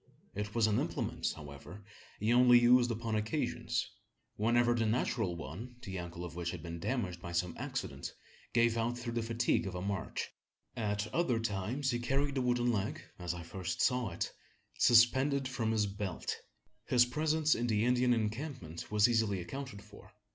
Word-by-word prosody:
It 105 +1 -4
was 115 -2 +4
an 105 -1 +2
implement, - - -1
however, 75 +7 -10 0.3
he 110 +3 +2
only 125 0 +7
used 120 0 +5
upon 115 -1 -2
occasions 110 +8 -1 0.5
whenever 120 +2 +3
the 115 -2 +1
natural 110 -4 0
one 90 - -7
the 95 -1 -4
ankle 85 0 -6
of 85 - -7
which 85 0 -3
had - - -6
been 85 -1 -6
damaged 90 -4 -2
by 85 - -6
some 85 0 0
accident - - -4 0.4
gave 115 -1 +3
out 120 +2 0
through 120 -1 -4
the 115 - 0
fatigue 115 -2 +1
of 90 - -5
a 90 - -3
march. 100 -2 -3 0.5
At 105 -2 -1
other 140 -9 +2
times 115 +6 -1
he 120 - -1
carried 140 +3 0
the 135 - 0
wooden 120 -1 +2
leg, 105 -3 -2 0.2
as 90 -1 -3
I 85 - -7
first 85 +1 -4
saw 125 -3 +2
it, 85 - -3 0.5
suspended 130 +4 +5
from 120 -4 -1
his 110 -2 +2
belt! 100 -3 -3 0.5
His 120 -1 +5
presence 155 +4 +2
in 120 - -1
the 110 -1 +2
Indian 125 0 +3
encampment 115 - -3
was 105 0 +5
easily 110 -5 +2
accounted 115 +4 -6
for. 105 0 -15
115 Hz, 175 wpm, -33 LUFS, 95-125 Hz, 0.5 s, only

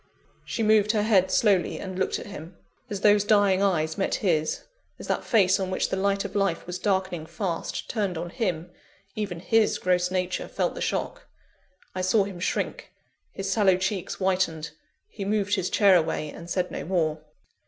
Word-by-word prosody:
She 225 - -3
moved 215 0 +4
her 210 -2 +1
head 195 -4 +3
slowly, 200 -5 +2
and 190 -1 -6
looked 190 - 0
at - - -8
him. 175 -3 -10 0.3
As 200 -3 -4
those 205 -1 +5
dying 205 -2 +3
eyes 160 -4 +1
met 195 - +1
his, 160 -6 0 0.3
as - - -9
that - - -1
face 200 -4 +3
on 190 -1 -2
which 185 - -1
the - - -1
light 200 +1 0
of 200 - -7
life 195 -4 0
was 180 0 -5
darkening 190 -5 -1
fast, 180 -4 -4
turned 200 -6 -2
on 170 +1 -5
him, 175 -6 -2 0.4
even 195 -5 -4
his 225 +4 +2
gross 180 -1 +1
nature 185 0 -2
felt - - -1
the - - -7
shock. - - -3 0.7
I 185 - -3
saw 190 +3 +3
him 195 -3 -7
shrink 180 - -3 0.4
his 195 0 -4
sallow 195 -3 +4
cheeks 190 0 -2
whitened, 185 -5 0 0.4
he 210 - -7
moved 205 0 0
his 190 -3 +1
chair 200 -3 +5
away, 155 -3 0
and 170 +1 -10
said 180 0 -1
no - - -4
more. 160 -4 0
190 Hz, 185 wpm, -26 LUFS, 180-205 Hz, 0.7 s, those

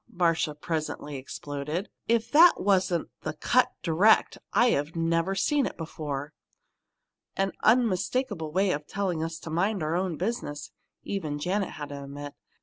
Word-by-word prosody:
Marcia 165 -3 +1
presently 150 -1 -4
exploded. 145 +6 -4 0.2
"If 230 0 +1
that 330 +4 +7
wasn't 185 -3 +1
the 155 - -3
'cut 250 +10 +3
direct,' 180 +6 +4
I've 165 -11 +2
never 165 +3 +1
seen 280 +7 +2
it - - -8
before!" 150 -3 -5 1.0
"An 195 0 0
unmistakable 220 - +1
way 190 +3 +2
of 150 -1 -3
telling 185 -5 -1
us 165 0 -4
to 165 - -7
mind 190 +2 0
our 155 +2 0
own 180 -3 -1
business!" 180 -8 -3 0.3
even 160 -7 -3
Janet 185 +5 -1
had 145 -1 -7
to 140 -1 -7
admit. 145 +1 -7
170 Hz, 145 wpm, -27 LUFS, 150-200 Hz, 1.0 s, that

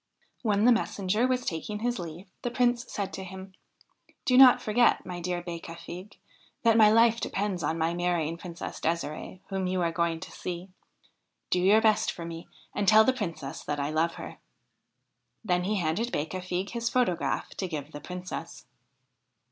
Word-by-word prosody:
When 210 -2 +2
the 245 - +7
messenger 215 0 +1
was 255 -1 0
taking 210 +5 -3
his 240 -1 -1
leave 170 +2 -7 0.2
the 245 - -1
Prince 245 -1 +1
said 200 -2 -3
to 190 - -5
him: 190 0 -9 0.4
' - - -35
Do 250 - +3
not 255 -1 +9
forget, 235 +3 +3
my 180 -1 -5
dear 175 0 -2
Becafigue, 170 +3 -8 0.5
that 230 -2 +5
my 215 -2 +7
life 230 +1 +4
depends 195 -3 -2
on 160 +2 -1
my 165 +1 +1
marrying 175 -2 0
Princess 170 0 -7
Desirde, 165 +2 -3
whom 190 -1 -1
you 180 -1 0
are 170 - +1
going 170 -1 0
to - - -8
see. 180 +1 -6 0.8
Do 180 - +3
your 200 +5 +5
best 220 0 +3
for 170 - -7
me 165 0 -7 0.3
and 205 -1 -1
tell 220 +1 +8
the 260 - +3
Princess 165 - -5
that 145 0 -3
I 145 +1 -1
love 160 +2 +1
her.' - - -9 1.1
Then 180 -2 +1
he 210 +2 0
handed 195 +6 0
Becafigue 185 +4 -3
his 235 -1 -1
photograph 245 -9 0
to 190 - -4
give 150 -3 -5
the 145 - -8
Princess. 180 +3 -7
185 Hz, 175 wpm, -28 LUFS, 170-220 Hz, 1.1 s, not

